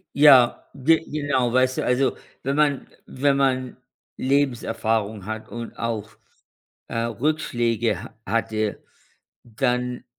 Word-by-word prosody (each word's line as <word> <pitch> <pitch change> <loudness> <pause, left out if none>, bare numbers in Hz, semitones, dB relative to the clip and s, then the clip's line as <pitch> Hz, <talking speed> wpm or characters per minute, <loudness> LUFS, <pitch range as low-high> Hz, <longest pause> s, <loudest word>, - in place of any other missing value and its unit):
Ja, 135 -4 +6
ge 150 +4 +3
genau, 140 -5 -1
weißt 130 0 +2
du, - - -1
also, 125 +2 +1 0.2
wenn 135 +2 -1
man 145 -2 +1 0.2
wenn 140 +1 +1
man 130 -2 0 0.4
Lebenserfahrung 115 -6 0
hat 110 +1 -6
und 120 0 -7
auch, 110 -2 -3 0.8
äh, - - -5
Rückschläge 120 -3 0
h - - -12
hatte, 110 -1 -1 0.6
dann 125 +1 -2
125 Hz, 110 wpm, -23 LUFS, 115-135 Hz, 0.8 s, Ja